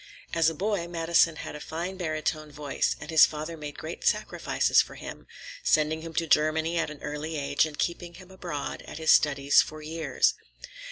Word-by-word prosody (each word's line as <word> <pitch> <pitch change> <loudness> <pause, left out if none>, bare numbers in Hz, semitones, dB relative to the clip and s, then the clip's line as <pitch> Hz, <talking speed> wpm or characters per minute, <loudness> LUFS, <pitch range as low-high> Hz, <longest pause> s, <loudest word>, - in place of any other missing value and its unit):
As 165 -1 +4
a 165 - -6
boy 195 0 -1
Madison 165 -1 +2
had 150 - -7
a - - -7
fine 170 +5 -5
barytone 155 -3 -3
voice, 145 -1 -1
and 150 - -8
his 160 - +8
father 155 +2 -6
made 150 -2 -8
great - - -7
sacrifices - - +2
for - - -8
him, - - -9 0.3
sending 155 +1 +2
him 165 0 -8
to 165 - +1
Germany 160 +2 +2
at 165 - 0
an 150 -1 -11
early 150 +2 -4
age 140 +2 +1
and 150 -2 -10
keeping 170 0 -3
him 185 +1 -14
abroad 175 -6 -5
at - - -8
his 160 -1 +3
studies 140 -1 +5
for 155 0 -7
years. 155 -3 +1
160 Hz, 185 wpm, -27 LUFS, 150-170 Hz, 0.3 s, his